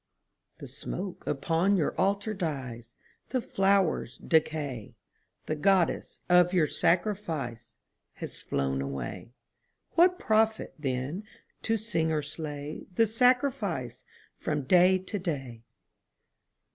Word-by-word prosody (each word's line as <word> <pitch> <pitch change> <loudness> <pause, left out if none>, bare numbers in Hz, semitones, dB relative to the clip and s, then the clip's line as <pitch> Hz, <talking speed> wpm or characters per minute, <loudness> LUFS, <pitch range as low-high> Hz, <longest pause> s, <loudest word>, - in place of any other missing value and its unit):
_) - - -39
The - - -9
smoke 185 0 -6
upon 165 +7 +2
your 160 - +1
Altar 200 +2 +1
dies, 130 - -5 0.3
The 255 - 0
flowers 195 - +1
decay, 150 -8 0 0.5
The 155 - -1
Goddess 185 +1 +1
of 180 0 +5
your 175 -4 +4
sacrifice 160 - -1 0.4
Has - - -8
flown 65 0 -1
away. 70 - -5 0.6
What 360 +2 +5
profit, 220 -3 +1
then, 140 +7 -3 0.4
to 225 0 +1
sing 180 -7 0
or 155 -1 0
slay 150 0 -6
The 225 - +5
sacrifice 230 - +1 0.4
from 150 -2 -1
day 180 +6 +5
to 190 +2 -5
day? 135 - -4
165 Hz, 110 wpm, -29 LUFS, 135-200 Hz, 0.6 s, of